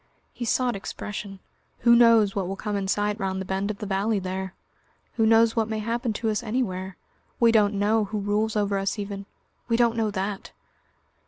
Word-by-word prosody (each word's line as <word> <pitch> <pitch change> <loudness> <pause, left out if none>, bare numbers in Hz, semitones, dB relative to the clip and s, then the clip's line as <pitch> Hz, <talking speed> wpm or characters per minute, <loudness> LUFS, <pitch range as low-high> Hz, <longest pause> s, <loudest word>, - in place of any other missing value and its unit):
He 240 - -5
sought 245 +1 +1
expression. 200 0 -6 0.4
"Who 235 0 +6
knows 230 -4 +5
what 195 -3 -1
will 195 - -3
come 210 +1 -4
in 195 -1 -2
sight 205 +2 0
round 190 -1 -2
the 190 - -4
bend 195 +2 -2
of 210 - -3
the 210 - -6
valley 205 +2 0
there? 190 0 -4 0.6
Who 225 -2 +2
knows 225 0 +5
what 225 -1 0
may 220 - -2
happen 230 +2 -2
to 220 +1 -1
us 210 - -1
anywhere? 195 -6 -3 0.4
We 235 -1 +5
don't 210 -2 +3
know 210 +2 +2
who 210 +2 -4
rules 210 +2 0
over 200 -1 +1
us 195 +3 -2
even... 200 -1 -5 0.4
we 230 -1 +2
don't 235 -1 +3
know 225 -2 0
that!" 195 0 -4
210 Hz, 195 wpm, -25 LUFS, 195-225 Hz, 0.6 s, Who